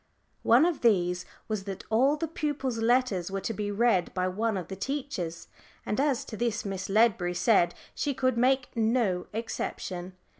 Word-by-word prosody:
One 245 +7 +5
of 345 -3 0
these 180 -6 +2 0.2
was 215 -3 -3
that 195 -1 -6
all 265 +7 +4
the 330 - -2
pupils' 285 -6 -2
letters 225 -6 +2
were 195 0 -2
to 225 - -2
be 210 -1 -3
read 205 -4 +2
by 185 0 +1
one 215 +2 -1
of 180 -3 -5
the 190 - -6
teachers, 195 - -4 0.4
and 210 - -1
as 275 -3 +1
to 220 - -7
this 230 0 -1
Miss 195 -1 -4
Ledbury 195 -4 +3
said 175 -3 +3 0.2
she 285 -2 -1
could 255 -1 +1
make 255 +2 +2
no 220 -5 +1
exception. 190 -4 -4
220 Hz, 175 wpm, -28 LUFS, 190-255 Hz, 0.4 s, One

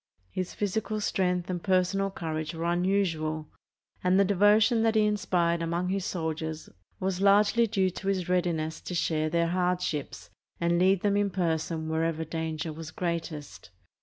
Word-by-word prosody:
His 185 -1 -4
physical 215 +1 -1
strength 180 -3 0
and 180 -2 -3
personal 190 +1 +2
cour 160 -4 -4
age 155 +1 -5
were 165 - -4
unusual, 170 -4 0 0.5
and 180 +1 +4
the 200 - +5
devotion 205 +4 +4
that 225 0 +2
he 215 -1 +4
inspired 175 -5 +1
among 170 +2 -1
his 195 -1 -1
soldiers 160 -2 -3 0.3
was 190 0 -1
largely 205 +4 +4
due 195 -3 +1
to 195 - -7
his 190 -3 0
readiness 170 -3 0
to 180 - -5
share 155 -2 0
their 170 +1 +1
hardships 180 -4 -2 0.3
and 170 0 +2
lead 190 0 +4
them 200 -1 +2
in 205 0 +2
person 165 -3 -1
whenever 160 0 -1
danger 160 0 -3
was 160 0 -8
greatest. 160 - -5
180 Hz, 160 wpm, -28 LUFS, 160-195 Hz, 0.5 s, the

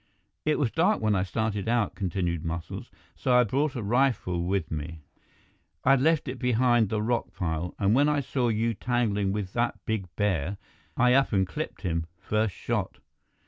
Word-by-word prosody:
"It 155 0 +2
was 130 -6 +1
dark 185 +7 +2
when 110 -1 +1
I 95 - +2
started 105 +1 -2
out," 115 -3 +1
continued 85 -3 -2
Muscles, 85 0 -5 0.3
"so 125 -2 +1
I 125 - +7
brought 135 +5 0
a 120 - -3
rifle 110 -6 +1
with 90 -2 -1
me. 80 +1 -5 0.8
I'd 135 -1 +5
left 155 +1 +2
it - - -1
up - - -15
behind 120 -3 +3
the 105 0 -1
rock 120 +1 -1
pile, 85 0 -2
and 100 +1 +2
when 145 +4 +4
I 150 -1 +2
saw 125 -1 -1
you 115 +1 +1
tangling 105 -4 0
with 100 -2 -3
that 120 0 0
big 110 -5 -2
bear, 95 -2 0 0.4
I 125 0 +5
up 135 -2 +3
and 95 -1 +3
clipped - - -6
him, 85 -2 -1
first 110 -2 0
shot. - - -2
110 Hz, 185 wpm, -27 LUFS, 95-125 Hz, 0.8 s, I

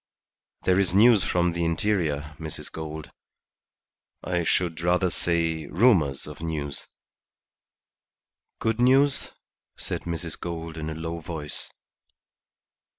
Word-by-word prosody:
There 95 0 +3
is 95 -2 +2
news 110 -1 +7
from 90 -1 +2
the 85 0 -1
interior, 80 -4 0
Mrs. 80 -2 -6
Gould. 80 -1 -6 1.1
I 90 -1 0
should 85 -1 0
rather 90 +1 +2
say 80 -3 0
rumours 85 - +3
of 75 +1 -9
news." 75 -4 -3 1.7
"Good 115 0 0
news?" 135 +3 +4 0.5
said - - -4
Mrs. 85 -1 -4
Gould 80 -2 -5
in 80 -1 -4
a 80 - -4
low 80 +1 -4
voice. 80 -2 -6
85 Hz, 110 wpm, -26 LUFS, 80-90 Hz, 1.7 s, news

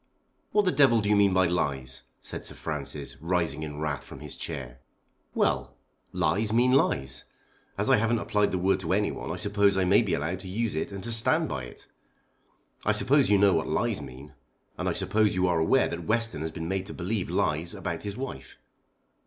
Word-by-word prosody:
"What 210 -1 +3
the 180 - +3
devil 130 -7 +5
do 105 -1 -1
you 105 - +5
mean 100 -1 +4
by 95 0 +4
lies?" 70 -7 -1
said - - -7
Sir - - -7
Francis, 70 -2 -5
rising 85 -3 0
in 75 -2 -5
wrath 75 -4 -2
from - - -11
his - - -7
chair. 65 -6 -6 0.6
"Well; - - 0 0.4
lies 90 +5 +1
mean 120 +3 +4
lies. 65 - +1 0.5
As - - 0
I - - +5
haven't 115 +2 +2
applied 105 -2 +1
the 95 - -1
word 95 +1 +2
to 90 -1 -1
anyone 105 -4 -1
I 85 - -2
suppose 100 +1 +2
I 95 - +2
may 95 +3 +5
be - - 0
allowed 85 +5 -2
to 95 - -8
use 110 +4 -1
it 80 - -2
and 100 -1 -7
to 115 - -3
stand 110 -1 +2
by 65 -1 -4
it. - - -13 1.0
I - - +2
suppose 135 +7 +3
you 105 - +5
know 100 -1 +5
what 80 - 0
lies - - 0
mean, 65 +3 -11 0.4
and - - -2
I - - +1
suppose 105 -3 +1
you 90 0 +2
are 85 -2 +2
aware 130 +12 +3
that 85 -1 -6
Western 115 -6 0
has 80 - -2
been 80 0 -5
made 95 +1 -2
to - - -7
believe 95 +2 -2
lies 80 +3 0
about 85 -2 -4
his 100 -1 -5
wife." 135 0 -7
95 Hz, 210 wpm, -27 LUFS, 80-105 Hz, 1.0 s, devil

